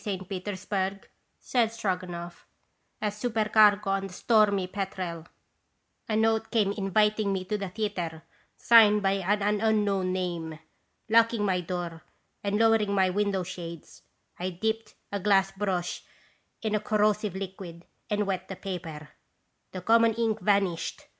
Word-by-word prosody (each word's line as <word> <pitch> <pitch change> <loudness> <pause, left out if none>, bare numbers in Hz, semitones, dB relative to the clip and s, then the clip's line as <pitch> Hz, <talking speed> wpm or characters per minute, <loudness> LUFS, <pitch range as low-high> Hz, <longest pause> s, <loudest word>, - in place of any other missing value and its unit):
St. 190 -4 -4
Peters 190 0 -5
burg," 195 -1 -2 0.3
said 235 -3 +1
Stroganoff, 180 -5 -4 0.5
"as 210 0 -3
supercargo 215 -3 +3
on 195 0 -1
the - - -13
Stormy 205 -2 +3
Petrel, 185 -4 -5 0.8
a 215 - +1
note 220 0 +2
came 210 -4 +2
inviting 210 +1 +1
me 190 -1 -2
to 210 - -2
the 200 -2 -3
theatre, 180 -6 -4 0.3
signed 210 -3 +6
by 195 - +3
an 205 +2 0
unknown 205 -4 +1
name. 170 -4 -3 0.5
Lock 230 +1 +4
ing 210 -2 0
my 185 -2 +1
door 175 -2 -5 0.4
and 200 0 0
lowering 220 -2 +3
my 190 -1 +3
window 200 -1 0
shades, 170 -3 -9 0.4
I 180 +1 -2
dipped 220 +5 -3 0.2
a 200 - -2
glass 195 -1 +3
brush 190 -3 -2 0.6
in 215 -1 -1
a 215 - +2
corrosive 210 -1 +1
liquid 185 -3 -7 0.2
and 210 -1 0
wet 195 -2 -3
the 190 - -6
paper. 170 -6 -7 0.6
The 185 - -6
common 230 +3 +4
ink 225 -2 0
vanished. 195 -3 0
200 Hz, 140 wpm, -28 LUFS, 185-215 Hz, 0.8 s, signed